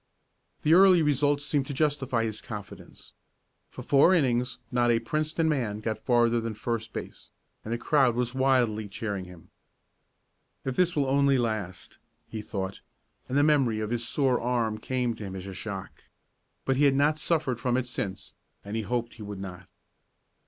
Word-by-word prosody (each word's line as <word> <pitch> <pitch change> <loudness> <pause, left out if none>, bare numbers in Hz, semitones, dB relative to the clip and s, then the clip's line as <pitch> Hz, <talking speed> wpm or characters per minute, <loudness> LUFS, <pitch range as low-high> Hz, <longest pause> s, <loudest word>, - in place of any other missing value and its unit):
The 155 - +4
early 185 -2 +7
results 145 0 +2
seemed 145 -3 0
to 140 - -5
justify 135 -5 +1
his 110 -1 -4
confidence. 105 -3 -9 0.6
For - - -9
four 145 +6 +5
innings 125 -5 +1
not 120 -1 +2
a 115 - +4
Princeton 155 +7 -1
man 120 -9 -1
got 110 0 -3
farther 120 -1 +3
than 115 -1 -4
first 115 0 -3
base, - - -8 0.3
and 110 - -6
the 120 - 0
crowd 130 -1 +3
was 120 0 -1
wildly 125 -5 +2
cheering 100 -2 -4
him. 90 -2 -14 1.1
"If 130 +3 -2
it 180 -1 +3
will 145 -2 +2
only 140 0 +3
last," 105 -8 -3 0.3
he 110 - -6
thought, 95 -2 -4 0.5
and 130 - 0
the 145 - +5
memory 135 -7 +3
of 110 +1 -3
his 120 -1 -1
sore 135 -4 +1
arm 115 -3 0
came 125 0 -1
to 110 - -9
him 95 -1 -6
as 95 0 -6
a 95 - -7
shock. 95 -1 -7 0.6
But 135 -1 +1
he 145 - +4
had 140 -1 +4
not 150 +2 +2
suffered 150 -9 0
from 125 0 +1
it 130 -1 -1
since, 100 -6 -4 0.3
and 100 +2 -5
he 115 - 0
hoped 120 +3 -2
he 115 - -13
would 100 -2 -6
not. 95 -1 -8
120 Hz, 180 wpm, -27 LUFS, 110-140 Hz, 1.1 s, early